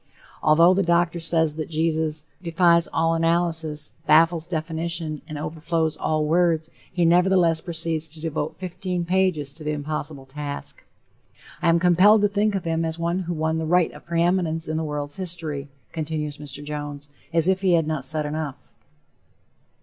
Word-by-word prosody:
Although 165 +4 +5
the 195 - +2
doctor 170 -1 +1
says 160 -2 +1
that 155 - -4
Jesus 160 -1 0 0.2
"defies 170 -1 +3
all 165 0 +1
analysis, 165 -2 0
baffles 165 +1 +4
definition 165 -1 -3
and 155 - -6
overflows 160 +1 -2
all 155 -1 -1
words," 165 0 +1 0.2
he 175 -1 +1
nevertheless 175 -1 +3
proceeds 165 -2 0
to 160 +1 -9
devote 155 0 -3
fifteen 180 -1 -4
pages 175 -6 0
to 155 +1 -7
the 150 0 -1
impossible 145 -1 -5
task. 145 +1 -6 0.8
"I - - +2
am 165 0 +4
compelled 180 +5 +5
to 205 - +4
think 205 +1 +1
of 190 - -3
him 165 0 0
as 160 0 -3
one 170 +2 -1
who 175 -2 -3
won 160 +1 -1
the 160 - -3
right 180 0 +3
of - - -15
preeminence 170 -1 +1
in 155 - -2
the 160 - -1
world's 145 -1 -3
history," 165 -6 -3 0.2
continues 150 -2 -4
Mr. 145 -1 -6
Jones, 145 -1 -6 0.2
as 165 0 +3
if 190 0 +2
he 185 -2 +3
had 165 -2 +3
not 155 -3 -2
said 155 +2 +3
enough. 150 -2 -5
165 Hz, 165 wpm, -23 LUFS, 155-170 Hz, 0.8 s, Although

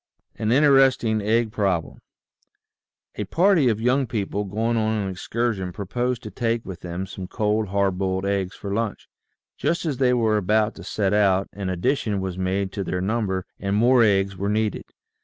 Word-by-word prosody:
AN 110 0 -1
INTERESTING 135 -5 +4
EGG 110 +2 +1
PROBLEM 95 -7 -1 1.3
PARTY 175 -7 +4
of 110 -2 0
young 125 +3 +2
people 105 -2 -2
going 110 +4 -1
on 110 -1 +1
an 100 -2 -2
excursion 100 0 -2
proposed 120 +6 -3
to - - -7
take 115 -2 -1
with 95 -3 -7
them 90 +1 -5
some 95 0 -8
cold, 105 +2 0
hard 95 -1 0
boiled 95 0 -1
eggs 100 -2 -1
for 100 -1 -5
lunch. 115 0 -3 0.5
Just 170 +1 0
as 145 -5 -1
they 125 -1 +3
were 110 -3 +2
about 105 +2 +1
to - - -11
set 100 -2 -1
out, 100 -2 +3
an 100 -2 -4
addition 100 +3 0
was 95 -2 -3
made 95 +1 -1
to 100 - -3
their 90 - -2
number 95 -2 -1
and 100 0 -1
more 120 +3 +5
eggs 100 -3 +2
were 100 +2 -2
needed. 105 0 -1
105 Hz, 175 wpm, -23 LUFS, 95-115 Hz, 1.3 s, more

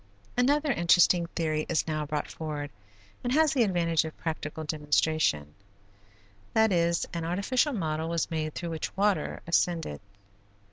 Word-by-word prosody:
Another 285 +4 +2
interesting 175 -2 +4
theory 155 -2 -1
is 170 - +1
now 155 -1 -2
brought 150 0 -2
forward 150 -2 -5 0.5
and 245 - -1
has 315 +1 +4
the 265 - +2
advantage 170 -6 +2
of 160 -1 -7
practical 160 -1 -4
demonstration, 150 - 0 1.0
that 220 -1 +4
is, 170 -1 +2
an 170 -1 -3
artificial 200 - +1
model 160 -5 -2
was 170 -1 -1
made 155 -1 -2
through 170 -1 -4
which 160 +4 -5
water 205 0 0
ascended. 170 - 0
165 Hz, 140 wpm, -28 LUFS, 155-190 Hz, 1.0 s, interesting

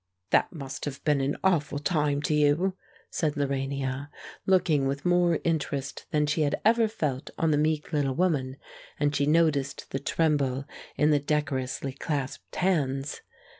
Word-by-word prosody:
"That - - +3
must 135 -5 -6
have 140 -2 -6
been 145 -3 +2
an 135 +2 -1
awful 160 -6 +2
time 150 -2 0
to 150 - +1
you," 150 +6 +3 0.4
said 155 -3 0
Lorania, 135 0 -2 0.4
looking 180 -7 +3
with 140 +3 -3
more 175 -2 +3
interest 145 -4 -2
than 150 -1 +2
she 150 +2 0
had 145 -1 +1
ever 225 0 +5
felt 150 - -3
on 165 -1 +2
the 145 - +3
meek 155 +1 0
little 140 -3 +1
woman; 140 -7 0 0.4
and 145 0 +1
she 140 0 +1
noticed 150 -3 +1
the 135 - -1
tremble 140 -3 +1 0.3
in 150 +1 +4
the 145 - +4
decorously 140 -2 -2
clasped 140 -1 -4
hands. 145 -7 0
145 Hz, 155 wpm, -27 LUFS, 140-160 Hz, 0.4 s, ever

